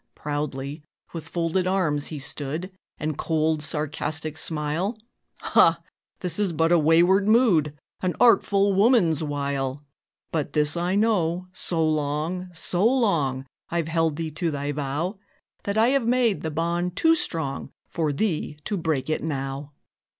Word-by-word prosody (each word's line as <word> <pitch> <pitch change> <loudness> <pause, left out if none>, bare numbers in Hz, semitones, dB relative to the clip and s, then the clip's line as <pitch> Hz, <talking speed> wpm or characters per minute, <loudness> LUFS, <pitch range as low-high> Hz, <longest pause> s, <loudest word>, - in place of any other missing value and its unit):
Proudly, 145 0 -4 0.3
with 165 -2 -6
folded 170 +2 0
arms 165 -7 0
he 155 - -6
stood, 145 +6 -4 0.3
And 155 -1 -3
cold, 160 -1 +1
sarcastic 155 0 -3
smile 160 +7 -2 0.4
"Ha! - - +4 0.4
this 180 +2 -2
is 200 -5 +1
but 165 +1 +2
a 175 - +6
wayward 175 +6 +4
mood, 185 - +3 0.2
An 185 -1 -1
artful 200 -4 +4
woman's 195 - +4
wile. 140 -2 -2 0.5
But 150 -3 -2
this 150 +1 +2
I 175 +2 0
know: 185 -5 +1
so 165 -3 +1
long 155 +4 -1
so 175 +2 -1
long 170 - +2 0.2
I've 170 -2 -1
held 165 -2 +1
thee 160 0 -4
to 165 +2 -1
thy 145 -1 -2
vow, 150 +7 -3 0.5
That 200 +1 -1
I 225 +2 +5
have 270 -3 +1
made 240 -4 +2
the 160 - -2
bond 170 +3 -1
too 325 - +4
strong 160 - -2 0.2
For 160 -3 -1
thee 155 -2 -1
to 205 - -1
break 160 -6 -1
it 155 - -1
now." 140 -1 -4
160 Hz, 145 wpm, -25 LUFS, 150-185 Hz, 0.5 s, a